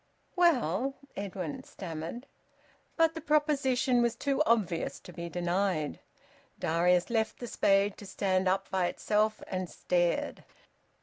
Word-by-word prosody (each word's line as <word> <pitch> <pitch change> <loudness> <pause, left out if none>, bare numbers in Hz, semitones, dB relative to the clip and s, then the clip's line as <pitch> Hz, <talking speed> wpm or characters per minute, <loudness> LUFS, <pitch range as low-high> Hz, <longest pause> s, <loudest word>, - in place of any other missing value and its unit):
"Well 270 - +2
" - - -35
Edwin 185 -6 -4
stammered. 170 - -7 0.7
But 325 -1 +3
the 325 - -6
proposition 280 -5 +2
was 235 -1 +1
too 275 +3 0
obvious 200 -8 +1
to - - -12
be 170 0 -6
denied. 175 -2 -1 0.6
Darius 175 +4 +2
left 220 -1 0
the 245 - -6
spade 200 -3 +2
to 205 - -10
stand 190 -1 0
up 195 +1 +1
by 185 -2 +2
itself, 215 +3 0
and 185 -2 -3
stared. 175 -1 0
200 Hz, 130 wpm, -30 LUFS, 180-245 Hz, 0.7 s, But